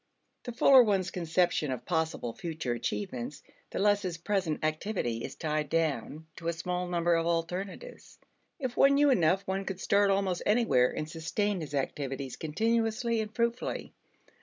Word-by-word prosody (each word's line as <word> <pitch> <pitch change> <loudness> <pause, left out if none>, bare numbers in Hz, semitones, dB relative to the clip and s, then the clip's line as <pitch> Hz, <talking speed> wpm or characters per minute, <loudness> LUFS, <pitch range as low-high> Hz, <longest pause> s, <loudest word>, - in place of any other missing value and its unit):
The 245 - -4
fuller 260 +2 +7
one's 195 -6 +1
conception 170 -3 +1
of 125 -2 -5
possible 160 -8 -1
future 160 -7 -3
achievements, 125 - -4 0.3
the - - -5
less 205 0 +3
his 180 -4 -3
present 170 -4 -1
activity 155 - -2
is - - -6
tied 155 -2 -2
down 160 -1 -1
to 165 - -6
a 170 - +1
small 180 +2 -3
number 175 -1 +1
of 165 0 +1
alternatives. 180 - -4 0.4
If 255 -5 -4
one 275 0 +5
knew 290 0 +5
enough, 185 -3 +3
one 190 +1 -2
could 195 -1 -5
start 200 +1 +3
almost 195 -2 +1
anywhere 210 - +3
and 155 - -4
sustain 180 +5 -2
his 145 -2 -5
activities 135 -1 -3
continuously 225 +6 0
and 215 -1 -5
fruitfully. 235 +1 -2
175 Hz, 160 wpm, -30 LUFS, 155-205 Hz, 0.4 s, fuller